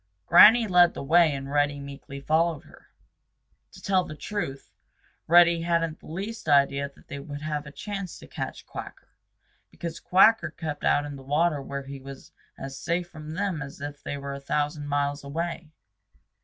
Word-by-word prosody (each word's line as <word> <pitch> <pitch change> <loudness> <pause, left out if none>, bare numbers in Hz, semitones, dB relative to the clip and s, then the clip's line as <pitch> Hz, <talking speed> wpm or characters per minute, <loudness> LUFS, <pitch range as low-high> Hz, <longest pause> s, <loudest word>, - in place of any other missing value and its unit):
Granny 230 +2 +8
led 180 -2 +5
the - - -5
way 165 +2 +5
and 135 0 -5
Reddy 145 0 +1
meekly 140 0 -9
followed 160 +2 +1
her. - - -19 0.9
To - - -12
tell 190 -2 +2
the 155 - -8
truth, 150 -7 -5 0.5
Reddy 170 0 +6
hadn't 165 -1 0
the - - -16
least 200 +2 -5
idea 140 0 +3
that 140 - -23
they 140 - -6
would 145 0 -8
have 150 -1 -3
a - - -9
chance 195 +4 -6
to - - -13
catch - - -6
Quacker, - - -9 0.6
because 170 -1 -6
Quacker 190 -1 +4
kept 155 -2 -6
out 145 - +3
in 145 -1 -7
the - - -11
water 150 +2 +1
where 140 0 -5
he 135 0 -8
was 135 0 -11 0.3
as 135 0 -7
safe 175 0 -2
from 155 -2 -8
them 190 -4 -2
as 140 0 -8
if 145 0 -7
they 145 - -5
were 140 0 -5
a 140 - -6
thousand 145 +1 -2
miles 145 0 -1
away. 165 +3 -4
150 Hz, 180 wpm, -26 LUFS, 140-170 Hz, 0.9 s, Granny